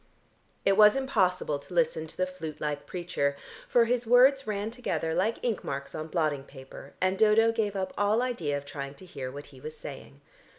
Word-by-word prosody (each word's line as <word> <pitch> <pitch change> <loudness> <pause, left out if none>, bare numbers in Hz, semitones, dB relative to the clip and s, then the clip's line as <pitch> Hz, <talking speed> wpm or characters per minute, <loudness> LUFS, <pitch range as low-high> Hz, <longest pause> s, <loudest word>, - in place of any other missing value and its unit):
It 195 0 +4
was 210 -1 +8
impossible 185 - +1
to 175 +5 -11
listen 160 -1 +1
to - - -12
the 185 - +2
flute 185 -4 -7
like 145 -1 -3
preacher, 170 -6 -1 0.3
for 240 -1 +4
his 240 0 0
words 260 +2 +5
ran 210 +1 -2
together 230 -9 -2
like 200 +7 +1
ink 230 -5 -1
marks 140 0 -5
on 155 0 -5
blotting 155 -4 0
paper, 135 0 -12
and 185 +1 +1
Dodo 220 +1 +5
gave 215 -3 -1
up 190 -1 -2
all 210 +4 +3
idea 170 - -1
of 140 - -8
trying 140 -1 -6
to 185 - -13
hear 135 -7 -6
what 145 +2 -8
he 130 - -13
was 155 +2 -7
saying. 140 -1 -10
185 Hz, 200 wpm, -28 LUFS, 145-220 Hz, 0.3 s, was